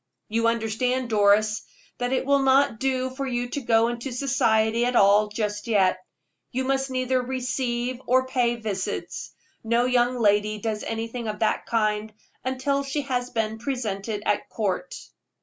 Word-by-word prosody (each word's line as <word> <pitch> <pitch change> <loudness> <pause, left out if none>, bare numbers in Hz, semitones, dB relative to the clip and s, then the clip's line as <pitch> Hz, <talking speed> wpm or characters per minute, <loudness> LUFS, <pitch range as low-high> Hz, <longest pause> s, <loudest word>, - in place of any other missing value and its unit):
"You 230 +1 +1
understand, 235 +2 0
Doris, 210 0 +3 0.4
that 245 0 -1
it 265 - 0
will 280 0 +3
not 270 -3 +3
do 260 0 0
for 270 +1 -4
you 245 -1 -1
to 285 - -3
go 230 -2 +3
into 240 +3 -4
society 230 -3 +2
at 245 0 0
all 205 +1 +5
just 210 0 -3
yet. 190 -5 +3 0.5
You 260 +2 -1
must 270 0 0
neither 255 0 0
receive 250 -1 -2
or 260 +1 +3
pay 245 -2 +1
visits. 210 -5 -4 0.3
No 235 +2 +2
young 250 0 +2
lady 210 -1 +2
does 215 0 -3
anything 225 +1 -4
of 210 -1 -3
that 220 - 0
kind 215 -1 0 0.3
until 260 +2 0
she 275 +2 -2
has 250 -2 -2
been 220 -2 -2
presented 220 -5 -3
at 205 - 0
court." 210 +3 -2
240 Hz, 155 wpm, -25 LUFS, 215-255 Hz, 0.5 s, all